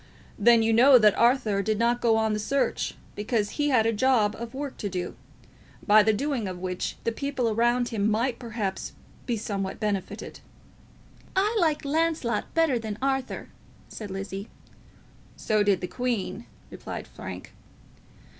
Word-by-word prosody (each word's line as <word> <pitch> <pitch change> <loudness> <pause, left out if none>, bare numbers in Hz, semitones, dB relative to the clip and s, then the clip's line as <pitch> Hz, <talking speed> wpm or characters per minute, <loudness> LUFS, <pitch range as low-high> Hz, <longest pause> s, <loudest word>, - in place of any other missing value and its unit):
"Then 230 +1 +6
you 225 0 +2
know 255 +4 +8
that 215 -3 +5
Arthur 235 -4 +3
did 215 +2 0
not 235 +2 +1
go 225 -2 +3
on 220 -1 +1
the 210 - -1
search, 275 +6 -1 0.2
because 210 0 -1
he 295 -1 0
had 240 -5 +3
a 225 - +2
job 215 -3 +2
of 235 +1 -7
work 280 0 -4
to 205 - -3
do, 180 -1 -4 0.7
by 215 0 +7
the 220 +1 +3
doing 245 -1 -1
of 185 -1 -5
which 180 0 -3
the 230 - 0
people 260 -1 -1
around 240 +2 +2
him 215 -2 0
might 235 +3 0
perhaps 220 -5 -4 0.3
be 240 -2 0
somewhat 195 -2 -4
benefited." 205 -4 -3 1.0
"I 410 +4 +2
like 310 -4 +1
Launcelot 315 -4 0
better 320 -7 +3
than 215 -2 -5
Arthur," 270 -1 -2 0.4
said 210 -2 -7
Lizzie. 195 +1 -6 0.9
"So 215 -1 +1
did 200 -3 +2
the 180 - -3
Queen," 235 -2 -3 0.2
replied - - -7
Frank. - - -9
225 Hz, 155 wpm, -26 LUFS, 205-255 Hz, 1.0 s, know